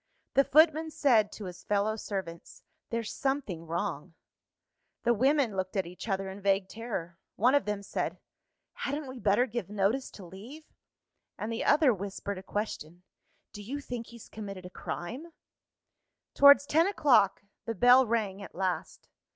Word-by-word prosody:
The 275 - +5
footman 315 +2 +4
said 235 -9 +3
to 210 - -8
his 180 -1 -9
fellow 210 +1 0
servants, 190 -6 -6 0.3
"There's 230 -1 -3
something 260 - -2
wrong." 170 -1 -4 0.9
The 240 - +3
women 260 -1 +2
looked 185 +1 -3
at 190 - +1
each 180 +6 -9
other 195 0 -1
in 190 +1 -8
vague 195 -1 +2
terror. 190 -7 -6 0.2
One 245 +5 +3
of 285 - +3
them 210 -1 -3
said, - - -3 0.6
"Hadn't 290 +2 -3
we 260 -1 -8
better 215 +3 +3
give 235 -6 -5
notice 210 +6 0
to 195 - -11
leave?" 230 - -11 0.7
And 215 - -4
the 225 - -2
other 290 -3 +4
whispered 200 0 -5
a - - -9
question: 180 -4 -5 0.5
"Do 205 - -8
you 260 +8 -5
think 245 -4 -6
he's 235 -2 -13
committed 195 -4 -8
a 180 - -9
crime?" 260 - -6 1.0
Towards 285 0 +7
ten 320 +4 +3
o'clock, 245 - +3 0.2
the 230 - -3
bell 245 +4 +6
rang 210 -4 -1
at - - -10
last. 185 0 -3
215 Hz, 160 wpm, -29 LUFS, 190-260 Hz, 1.0 s, Towards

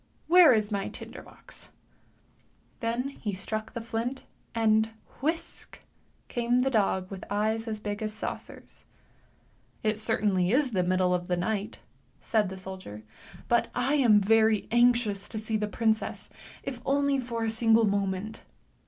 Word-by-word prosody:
Where 350 -2 +8
is 215 -3 +2
my 200 -1 -1
tinder - - -9
box? - - -10 1.1
Then 240 +2 -1
he 215 -7 -5
struck 215 +3 -4
the 235 - -4
flint, 230 +3 -3 0.3
and, 220 -1 +3 0.3
whisk, 320 +4 -3 0.5
came 240 +1 +1
the 265 +1 +1
dog 195 -4 +1
with 190 -1 -7
eyes 220 +2 0
as 215 -1 -3
big 205 +1 -4
as 215 0 -1
saucers. 220 - -7 0.5
" - - -36
It 215 -1 +1
certainly 205 -5 +1
is 265 +1 +2
the 190 -4 +1
middle 180 0 +2
of 175 0 -1
the 180 - 0
night," 200 +3 -2 0.4
said 215 -4 +1
the 190 - -7
soldier, 185 - -8 0.2
" - - -17
but 235 0 +2
I 245 +3 +1
am 240 -8 +5
very 220 +1 +3
anxious 240 -4 +3
to 220 - -3
see 220 +1 -3
the 210 -1 0
princess, 220 +1 -1 0.3
if 255 -3 -5
only 280 0 +2
for 235 -2 -3
a - - 0
single 225 0 +4
moment." 200 +1 -1
220 Hz, 155 wpm, -28 LUFS, 200-240 Hz, 1.1 s, Where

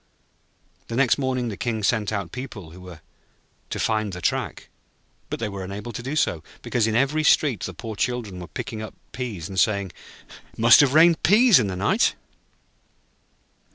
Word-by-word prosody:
The 115 - -5
next 135 +1 +3
morning 130 -3 -1
the 105 - -5
King 110 -3 -2
sent 110 0 +1
out 100 -5 -3
people 120 -10 -8
who 90 +2 -13
were 90 -4 -11 0.7
to - - -4
find 110 -3 0
the 90 - -6
track; - - -2 0.6
but - - -4
they 115 - -2
were 100 -2 -6
unable 100 +5 -6
to 115 - -6
do 135 +5 -4
so, 85 - 0 0.2
because 115 -3 0
in 110 - -1
every 140 +5 +1
street 145 -6 +3
the - - -5
poor 110 -2 -7
children 110 -5 -3
were 90 - -8
picking 110 +4 -6
up 110 - -8 0.2
peas, 110 -10 -5
and 95 -2 -3
saying: 100 -3 +1 0.6
'It - - -23
must 115 +1 +7
have 145 -1 +4
rained 165 +1 +6
peas 215 - +6
in 110 - 0
the 95 - -4
night.' 95 +3 +2
110 Hz, 185 wpm, -23 LUFS, 100-130 Hz, 0.7 s, must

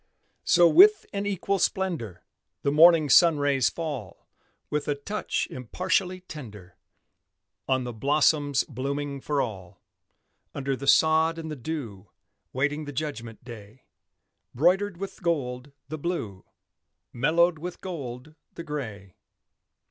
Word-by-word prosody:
So 175 -1 +6
with 410 - +6
an 200 0 -2
equal 195 0 -1
splendor, 165 - -2 0.4
The 140 - +1
morning 160 0 +6
sun 165 +3 +6
rays 140 -3 +2
fall, 145 - -6 0.4
With 150 -1 -2
a 145 - 0
touch 205 +9 -3
impartially 180 - -2
tender, 105 - -11 0.9
On 130 -1 +1
the 120 -1 -5
blossoms 145 +2 +2
blooming 140 +1 -4
for 145 0 0
all: 95 -6 -8 0.8
Under 135 -1 -2
the 140 +1 -7
sod 160 +2 +4
and 160 -1 -6
the - - -4
dew, 120 -8 -6 0.4
Waiting 145 +3 -1
the 145 - -6
judgment 120 -6 -6
day; 115 0 -12 0.7
Broidered 180 +7 +2
with 195 +1 -7
gold, 140 -6 -2 0.2
the 155 +2 -6
Blue, 115 - -4 0.7
Mellowed 160 +6 +2
with 175 +2 -7
gold, 145 -5 -7 0.2
the 170 - -7
Gray. 110 - -7
145 Hz, 125 wpm, -26 LUFS, 125-170 Hz, 0.9 s, So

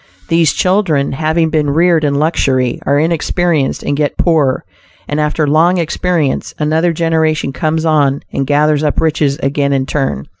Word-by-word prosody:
These 165 -3 +3
children, 180 -7 +1
having 160 +3 0
been 150 -2 0
reared 165 +2 +2
in 145 -1 0
luxury, 135 -5 0
are 140 - +3
inexperienced 165 -1 0
and 145 - -1
get 145 0 -1
poor; 150 -6 +1 0.4
and 145 - -2
after 150 +1 0
long 160 +5 +3
experience 170 -3 -1
another 160 +3 +1
generation 160 -3 0
comes 160 +2 -1
on 145 -3 +1
and 135 - -2
gathers 150 0 +2
up 150 -2 0
riches 150 -3 0
again 140 +1 0
in 135 -1 0
turn. 135 - -2
155 Hz, 155 wpm, -14 LUFS, 140-165 Hz, 0.4 s, These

